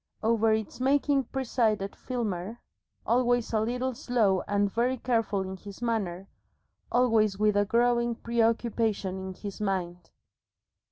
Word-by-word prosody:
Over 225 0 +3
its 220 +1 -2
making 275 +1 +2
presided 225 -6 -1
Filmer, 225 -3 -4 0.5
always 245 -1 +1
a 220 - +3
little 250 +4 -1
slow 220 -6 +1
and 205 0 +2
very 250 +3 +1
careful 225 -5 0
in 190 0 -5
his 200 +1 -11
manner, 200 -6 -2 0.6
always 225 -5 +3
with 210 0 +2
a 205 0 +3
growing 235 +2 +2
preoccupation 225 -4 0
in 190 - -5
his 200 +1 -7
mind. 180 -4 -3
225 Hz, 125 wpm, -28 LUFS, 200-240 Hz, 0.6 s, Over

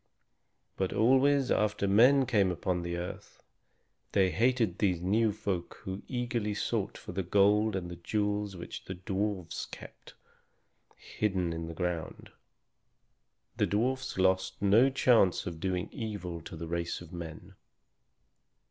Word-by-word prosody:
But 95 -1 -1
always 135 +4 +4
after 105 -1 +1
men 125 +7 +6
came 105 -7 +2
upon 90 +1 -1
the 85 0 -3
earth 90 +1 -8 0.7
they 95 -2 +3
hated 115 -1 +1
these 95 -5 +2
new 105 +5 +2
folk 100 -4 -4
who 95 +1 -5
eagerly 120 -4 -2
sought - - -2
for - - -9
the 95 +2 -2
gold 105 +3 +3
and 90 -2 -3
the 85 - -7
jewels 105 +2 -1
which 85 - -8
the 95 - -5
dwarfs 95 -1 -3
kept - - -12 0.8
hidden 95 -5 -2
in 80 0 -5
the 85 - -7
ground. 90 -2 -4 1.3
The - - +2
dwarfs 130 +4 -1
lost 95 0 +1
no 105 +6 +5
chance 120 -8 +3
of 85 -3 -5
doing 90 0 -1
evil 100 -8 -5
to - - -7
the 80 +1 -6
race 85 +1 -3
of 85 -1 -12
men. 85 -2 -8
95 Hz, 140 wpm, -30 LUFS, 90-110 Hz, 1.3 s, men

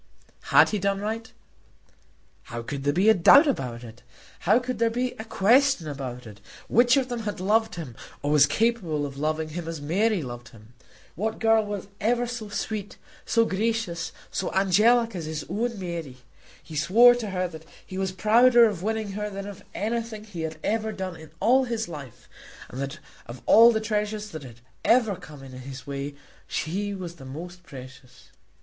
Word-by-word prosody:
Had - - +6
he 210 - -1
done 195 0 0
right? 220 +2 -4 1.1
How 115 0 -6
could 140 +3 -5
there 145 - +3
be 185 +7 +2
a 220 - +8
doubt 220 - +7
about 125 - -2
it? 115 0 -12 0.4
How 200 +6 +4
could 250 -2 -3
there 230 0 +3
be 245 +2 -1
a - - -4
question 230 - +3
about 130 -4 -6
it? 105 -1 -12 0.3
Which 240 +2 +4
of 265 -2 +1
them 245 -2 -4
had 210 -4 -4
loved 220 +4 +1
him, 150 -9 -7 0.3
or 145 - 0
was 145 -1 +6
capable 175 -6 0
of 140 -1 -7
loving 155 +1 -1
him 165 +1 -6
as 165 -2 -4
Mary 185 +5 +1
loved 120 -2 -8
him? 110 +1 -17 0.4
What 220 +5 -2
girl 225 -1 +3
was 205 -2 -5
ever 240 +3 +1
so 235 -3 -6
sweet, 205 0 -4 0.3
so 230 -1 +3
gracious, 205 -5 -1 0.2
so 190 - -2
angelic, 215 +4 +3
as 170 -3 -4
his 155 -1 -5
own 230 +5 -2
Mary? 170 -8 -5 0.5
He 160 - -10
swore 225 +11 +6
to 235 -4 -4
her 185 -1 -1
that 160 -2 -11 0.2
he 190 -1 -6
was 190 -1 -1
prouder 235 +5 +5
of 205 -6 -1
winning 220 0 -2
her 210 +1 -3
than 195 -1 -6
of 200 -1 -9
anything 225 0 -3
he 200 -6 -8
had 160 -1 -4
ever 220 0 0
done 190 -3 -5
in 160 -1 -12
all 260 +3 +4
his 230 -2 -2
life, 145 -7 -10 0.4
and 130 - -6
that 140 +3 -4 0.3
of 120 0 -10
all 230 +2 +8
the 220 - 0
treasures 210 -1 -2
that 155 - -7
had 120 -4 -12 0.2
ever 230 -4 +3
come 150 -5 -12
in 135 - -11
his 130 +1 -9
way 140 0 -5 0.3
she 200 +5 -2
was 175 -3 -7
the 135 - -12
most 170 +7 -8
precious. 130 -4 -13
195 Hz, 190 wpm, -26 LUFS, 150-225 Hz, 1.1 s, a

